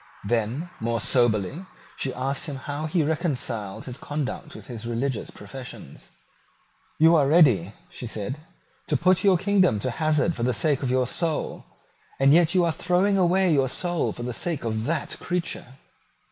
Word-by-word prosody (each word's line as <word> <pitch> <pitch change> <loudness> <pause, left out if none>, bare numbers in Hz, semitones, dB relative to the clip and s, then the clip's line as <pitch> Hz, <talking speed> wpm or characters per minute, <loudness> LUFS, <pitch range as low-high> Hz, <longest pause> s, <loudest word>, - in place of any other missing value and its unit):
Then, 120 - -1
more 115 +1 -1
soberly, 120 - +2 0.3
she 135 - -2
asked 135 +5 -2
him 145 - -4
how 145 +3 -4
he 160 0 +1
reconciled 135 - -2
his 125 0 -7
conduct 145 -2 -4
to - - -9
his 115 -2 -8
religious 120 0 -2
professions. 125 +5 -10 0.9
"You 165 +2 +6
are 145 -4 +4
ready," 125 - +4 0.2
she 120 - -7
said, 115 +5 -4 0.5
"to - - +1
put 185 +1 +3
your 195 -3 +5
kingdom 190 - +3
to 125 +5 -2
hazard 155 +3 +1
for - - -6
the 125 0 +1
sake 145 +2 +1
of 130 - -1
your 130 0 +2
soul; 160 +5 -2 0.5
and 135 +1 +5
yet 170 +2 +4
you 180 -2 +4
are 165 - +2
throwing 180 +4 +1
away 185 0 +3
your 135 -3 +2
soul 175 +4 0
for 120 - -7
the 125 0 -3
sake 165 +5 -2
of 110 -1 -2
that 155 -1 -2
creature." 170 -7 -4
140 Hz, 170 wpm, -25 LUFS, 120-170 Hz, 0.9 s, You